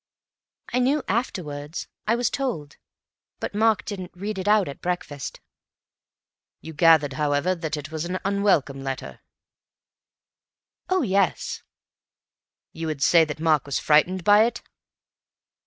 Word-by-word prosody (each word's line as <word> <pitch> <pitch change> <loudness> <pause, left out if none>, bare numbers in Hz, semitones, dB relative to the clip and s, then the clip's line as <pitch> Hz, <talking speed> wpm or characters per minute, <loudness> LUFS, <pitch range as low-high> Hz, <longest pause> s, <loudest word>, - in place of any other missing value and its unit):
"I 250 - +2
knew 270 +4 +2
afterwards. 155 - -3 0.2
I 225 - +3
was 240 -1 0
told. 220 - -3 0.6
But - - -4
Mark 220 +1 +2
didn't 190 -4 -5
read 200 +2 -4
it 190 - -4
out 210 -2 +4
at 140 - -8
breakfast." 175 -6 -4 1.2
"You 160 - -9
gathered, 155 -2 +5
however, 150 +4 +1
that 160 -3 -4
it 150 +1 -7
was 160 -1 -3
an 180 +2 -2
unwelcome 195 -9 +1
letter?" 135 -1 -5 1.7
"Oh, 370 -3 +2
yes!" 195 - 0 1.1
"Would 160 - -10
you 160 -1 -1
say 165 +3 +5
that 150 -1 -6
Mark 155 -3 +2
was 140 - -1
frightened 170 +5 +3
by 210 +3 +6
it?" 240 0 -3
175 Hz, 130 wpm, -24 LUFS, 150-205 Hz, 1.7 s, by